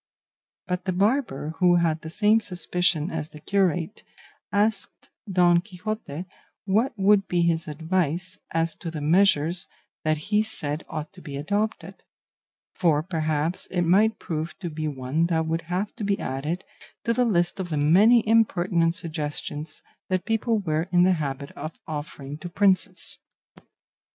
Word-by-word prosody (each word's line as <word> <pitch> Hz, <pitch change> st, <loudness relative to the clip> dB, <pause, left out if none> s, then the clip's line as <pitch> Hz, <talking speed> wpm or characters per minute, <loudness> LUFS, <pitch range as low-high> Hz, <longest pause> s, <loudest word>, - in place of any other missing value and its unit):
But 180 Hz, 0 st, -3 dB
the 185 Hz, -, 0 dB
barber, 200 Hz, -, 0 dB
who 180 Hz, -1 st, +5 dB
had 165 Hz, -2 st, +1 dB
the 160 Hz, -, -7 dB
same 210 Hz, +6 st, +4 dB
suspicion 180 Hz, -5 st, 0 dB
as 160 Hz, -1 st, -4 dB
the 150 Hz, -, -12 dB
curate, 180 Hz, 0 st, 0 dB, 0.5 s
asked 205 Hz, 0 st, -1 dB, 0.2 s
Don 175 Hz, -2 st, +5 dB
Quixote 185 Hz, -4 st, -5 dB, 0.4 s
what 215 Hz, +7 st, +2 dB
would 195 Hz, 0 st, +4 dB
be 175 Hz, -1 st, +1 dB
his 165 Hz, -1 st, +1 dB
advice 170 Hz, +3 st, -1 dB
as 165 Hz, 0 st, 0 dB
to 170 Hz, -, -5 dB
the 160 Hz, -2 st, -5 dB
measures 170 Hz, +1 st, +3 dB, 0.4 s
that 155 Hz, 0 st, +2 dB
he 210 Hz, +8 st, +1 dB
said 155 Hz, -8 st, -3 dB
ought 155 Hz, +2 st, -5 dB
to 185 Hz, -, -14 dB
be 140 Hz, -4 st, -6 dB
adopted; 195 Hz, +3 st, -2 dB, 0.7 s
for 155 Hz, -4 st, +2 dB
perhaps 160 Hz, -1 st, -1 dB
it 180 Hz, -1 st, 0 dB
might 205 Hz, +6 st, +4 dB
prove 160 Hz, 0 st, -4 dB
to 175 Hz, -4 st, -5 dB
be 155 Hz, 0 st, -3 dB
one 140 Hz, +3 st, 0 dB
that 160 Hz, -2 st, +1 dB
would 165 Hz, +1 st, -1 dB
have 185 Hz, +3 st, -2 dB
to 225 Hz, -, -4 dB
be 200 Hz, -1 st, 0 dB
added 150 Hz, +8 st, -3 dB, 0.4 s
to 230 Hz, -, +1 dB
the 250 Hz, -, +2 dB
list 175 Hz, -6 st, +1 dB
of 185 Hz, -2 st, -3 dB
the 155 Hz, -, -1 dB
many 205 Hz, +11 st, +5 dB
impertinent 175 Hz, -6 st, +3 dB
suggestions 155 Hz, -1 st, -5 dB, 0.3 s
that 185 Hz, -1 st, 0 dB
people 225 Hz, +1 st, +1 dB
were 165 Hz, -3 st, -1 dB
in 175 Hz, -1 st, +5 dB
the 185 Hz, +1 st, +5 dB
habit 140 Hz, 0 st, -4 dB
of 155 Hz, +2 st, -8 dB
offering 145 Hz, -1 st, -6 dB
to 175 Hz, -, -6 dB
princes. 185 Hz, -1 st, +1 dB
175 Hz, 155 wpm, -25 LUFS, 155-195 Hz, 0.7 s, who